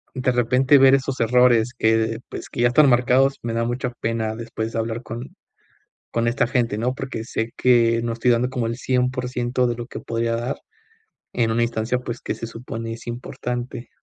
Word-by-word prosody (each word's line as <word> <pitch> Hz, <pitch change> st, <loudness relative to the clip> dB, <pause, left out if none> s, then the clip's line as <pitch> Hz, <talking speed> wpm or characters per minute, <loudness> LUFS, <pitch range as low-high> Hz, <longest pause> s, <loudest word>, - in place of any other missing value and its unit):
de 130 Hz, 0 st, +1 dB
repente 125 Hz, +3 st, +4 dB
ver 135 Hz, 0 st, +7 dB
esos 135 Hz, 0 st, -2 dB
errores 120 Hz, 0 st, +4 dB
que, 110 Hz, 0 st, +2 dB
pues -, -, -7 dB
que, -, -, -4 dB
ya 120 Hz, -, +5 dB
están 140 Hz, +2 st, +5 dB
marcados, 130 Hz, +3 st, +3 dB
me 115 Hz, -1 st, -2 dB
da 115 Hz, 0 st, 0 dB
mucha 125 Hz, +1 st, -2 dB
pena 110 Hz, -1 st, -1 dB
después 115 Hz, -1 st, -5 dB
de 115 Hz, -, -1 dB
hablar 115 Hz, +2 st, -3 dB
con 115 Hz, +3 st, -8 dB, 0.8 s
con 115 Hz, 0 st, 0 dB
esta 120 Hz, 0 st, +1 dB
gente, 120 Hz, -4 st, 0 dB
¿no? 125 Hz, +3 st, -1 dB
Porque 130 Hz, -5 st, -5 dB
sé 115 Hz, 0 st, -3 dB
que, 115 Hz, -2 st, +3 dB
no 115 Hz, -1 st, -1 dB
estoy 120 Hz, +2 st, +2 dB
dando 120 Hz, +2 st, +2 dB
como 125 Hz, -3 st, -2 dB
el 115 Hz, +1 st, -3 dB
100% 125 Hz, -1 st, 0 dB
de 120 Hz, -, -1 dB
lo 120 Hz, 0 st, -6 dB
que -, -, -7 dB
podría 115 Hz, 0 st, -1 dB
dar, 120 Hz, +4 st, -3 dB, 0.8 s
en 115 Hz, -2 st, +1 dB
una 115 Hz, +1 st, +1 dB
instancia, 115 Hz, +1 st, -1 dB
pues, 120 Hz, -2 st, -6 dB
que -, -, -3 dB
se 115 Hz, -, -5 dB
supone 115 Hz, -1 st, -6 dB
es 115 Hz, +1 st, -9 dB
importante. 120 Hz, 0 st, -5 dB
120 Hz, 195 wpm, -22 LUFS, 115-125 Hz, 0.8 s, ver